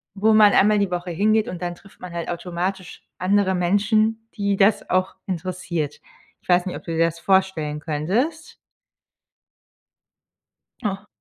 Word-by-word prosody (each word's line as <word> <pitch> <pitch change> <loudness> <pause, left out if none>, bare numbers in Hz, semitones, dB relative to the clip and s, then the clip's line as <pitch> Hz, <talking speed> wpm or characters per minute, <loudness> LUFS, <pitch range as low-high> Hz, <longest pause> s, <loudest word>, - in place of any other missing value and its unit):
wo 215 +2 +3
man 215 -1 +7
einmal 210 +1 +4
die 200 -2 0
Woche 175 0 -3
hingeht, 215 +5 +2
und 180 - -6
dann 175 0 -3
trifft 195 +3 -20
man 180 -1 -8
halt 170 -1 -4
automatisch 180 +1 -4 0.2
andere 190 0 +2
Menschen, 215 +5 +1
die 200 -2 0
das 200 +2 +3
auch 185 +1 0
interessiert. 170 -4 -4 0.4
Ich - - -29
weiß 180 +1 +4
nicht, 185 - -4
ob - - -8
du 165 - -6
dir 165 0 +2
das 165 0 -3
vorstellen 190 -6 +1
könntest? 195 - -2 2.3
Ah. 195 0 -3
185 Hz, 150 wpm, -22 LUFS, 175-205 Hz, 2.3 s, man